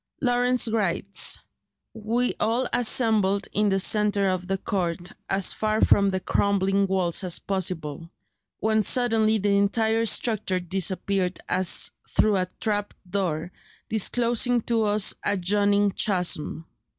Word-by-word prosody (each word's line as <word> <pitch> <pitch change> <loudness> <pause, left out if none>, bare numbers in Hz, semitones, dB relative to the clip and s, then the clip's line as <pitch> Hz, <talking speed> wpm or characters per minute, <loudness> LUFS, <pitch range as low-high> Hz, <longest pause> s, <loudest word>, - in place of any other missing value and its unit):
Lawrence 245 -1 +1
writes: 200 -3 0 0.5
"We 230 +3 -1
all 235 +4 0
assembled 220 -5 +1
in 210 0 +2
the 195 0 +1
centre 205 0 +2
of 185 -1 -3
the 195 0 -1
court, 175 -1 -3 0.2
as 195 -1 +1
far 215 0 -1
from 200 -1 +4
the 190 -1 -1
crumbling 195 +1 +1
walls 185 -1 0
as 180 -2 0
possible,... 170 -5 -3 0.5
when 220 0 +1
suddenly 220 -1 +2
the 200 -1 +1
entire 220 +3 +1
structure 215 -5 0
disappeared 185 +1 -1
as 185 -1 +2 0.2
through 215 -2 +2
a 185 -1 -1
trap 205 -2 -2
door, 180 -3 -2 0.4
disclosing 235 +2 +1
to 225 -1 0
us 210 -1 +2
a 205 - +1
yawning 200 +2 +2
chasm. 180 -5 -1
200 Hz, 125 wpm, -24 LUFS, 185-220 Hz, 0.5 s, from